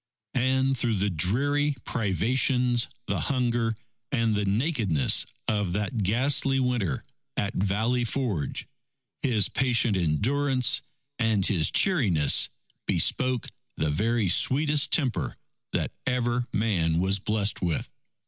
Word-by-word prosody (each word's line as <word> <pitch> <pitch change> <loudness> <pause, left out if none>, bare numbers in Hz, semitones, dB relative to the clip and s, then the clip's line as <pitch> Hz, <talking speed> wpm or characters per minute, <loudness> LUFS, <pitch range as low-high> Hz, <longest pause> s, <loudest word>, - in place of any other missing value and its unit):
And 130 +1 +1
through 115 -2 +1
the 100 +1 0
dreary 140 - +1
privations, 120 - +1 0.2
the - - -2
hunger, 120 -4 0 0.4
and 115 -5 +1
the 105 -1 0
nakedness 105 - +1 0.2
of 105 -5 0
that 105 +3 -2
ghastly 135 +6 +2
Winter 120 - -1 0.3
at 100 - -1
Valley 110 +6 0
Forge, 115 - -2 0.6
his 115 -7 +2
patient 120 -4 +1
endurance 125 - +1 0.4
and 110 -5 +1
his 85 -6 +2
cheeriness 100 - +3 0.4
bespoke 130 -2 +1 0.3
the 80 -1 0
very 110 +6 0
sweetest 145 - +3
temper 130 -7 -1 0.3
that - - -1 0.2
ever 125 -1 0
man 90 -7 +1
was 95 +3 +1
blessed 105 +1 -1
with. 85 -4 -1
115 Hz, 110 wpm, -26 LUFS, 100-130 Hz, 0.6 s, cheeriness